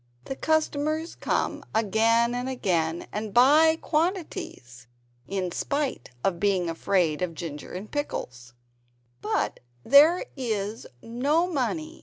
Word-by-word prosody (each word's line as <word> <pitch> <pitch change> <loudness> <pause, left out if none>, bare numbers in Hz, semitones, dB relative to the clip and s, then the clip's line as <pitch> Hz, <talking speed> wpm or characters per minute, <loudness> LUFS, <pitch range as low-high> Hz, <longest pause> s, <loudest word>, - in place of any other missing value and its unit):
The 270 - -4
customers 315 +1 0
come - - -2
again 230 +2 +3
and 250 +1 -3
again, 170 -9 -1
and 210 -1 -5
buy 305 +6 +6
quantities, 305 - -3 0.4
in 185 -1 -2
spite 280 - -2
of 175 -3 0
being 185 -4 +1
afraid 165 -2 0
of 175 -2 -2
Ginger 155 -4 -7
and 190 +4 -7
Pickles. 120 - -5
210 Hz, 90 wpm, -26 LUFS, -, 0.4 s, buy